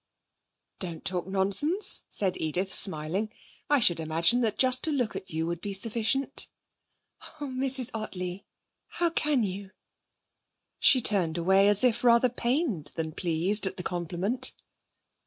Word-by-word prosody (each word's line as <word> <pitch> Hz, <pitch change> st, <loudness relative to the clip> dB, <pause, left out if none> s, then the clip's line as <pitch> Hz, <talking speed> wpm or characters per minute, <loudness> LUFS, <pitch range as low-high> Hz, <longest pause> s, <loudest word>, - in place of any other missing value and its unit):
'Don't 170 Hz, -4 st, -6 dB
talk 180 Hz, -2 st, -1 dB
nonsense,' 200 Hz, -, +1 dB
said 190 Hz, -3 st, 0 dB
Edith, 180 Hz, +5 st, -2 dB
smiling. 185 Hz, +4 st, +2 dB, 0.4 s
'I 290 Hz, -1 st, +3 dB
should 175 Hz, -6 st, +5 dB
imagine 165 Hz, +9 st, +1 dB
that 220 Hz, -3 st, -1 dB
just 255 Hz, -1 st, +4 dB
to 315 Hz, -, +1 dB
look 250 Hz, -6 st, -2 dB
at 190 Hz, -, -8 dB
you 160 Hz, 0 st, -3 dB
would 170 Hz, 0 st, -4 dB
be 205 Hz, -, -5 dB
sufficient.' 230 Hz, +6 st, 0 dB, 0.9 s
'Oh, 295 Hz, -, -5 dB
Mrs. 260 Hz, -1 st, -2 dB
Ottley! 185 Hz, -4 st, -6 dB, 0.4 s
How 345 Hz, -1 st, -2 dB
can 295 Hz, -6 st, 0 dB
you?' 195 Hz, 0 st, -5 dB, 1.1 s
She 255 Hz, -, +5 dB
turned 180 Hz, -7 st, +1 dB
away 190 Hz, +3 st, +3 dB
as 205 Hz, +2 st, +4 dB
if 240 Hz, -2 st, +1 dB
rather 240 Hz, +1 st, +4 dB
pained 240 Hz, -, -2 dB
than 160 Hz, -1 st, -4 dB
pleased 180 Hz, +5 st, +2 dB
at -, -, -6 dB
the 180 Hz, -, -6 dB
compliment. 180 Hz, +9 st, -1 dB
200 Hz, 140 wpm, -27 LUFS, 175-250 Hz, 1.1 s, should